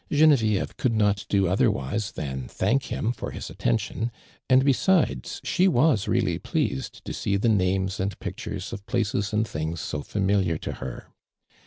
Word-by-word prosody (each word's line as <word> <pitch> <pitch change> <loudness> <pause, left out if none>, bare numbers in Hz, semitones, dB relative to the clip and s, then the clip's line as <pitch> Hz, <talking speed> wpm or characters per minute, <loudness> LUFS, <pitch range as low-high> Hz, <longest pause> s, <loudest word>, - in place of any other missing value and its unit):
Genevieve 140 -9 +3
could 120 -3 +1
not 105 -2 +1
do 100 -2 +3
otherwise 95 +2 0
than 65 -3 -4
thank 115 - 0
him 115 - -1
for - - -5
his - - -7
attention, 110 - -1 0.4
and 130 +1 +5
besides, 165 +6 +2
she 185 - +3
.was 140 - +3
really - - +1
pleased 65 - -2
to - - -4
see 100 -1 0
the 105 - +1
names 95 -1 +1
and 95 -1 -2
pictures - - -5
of 100 - -6
places 100 -3 0
and 110 +1 +1
things 80 0 -3
so 75 +1 -3
familiar 95 -2 +1
to - - -5
her. - - -7
100 Hz, 160 wpm, -26 LUFS, 95-120 Hz, 0.4 s, and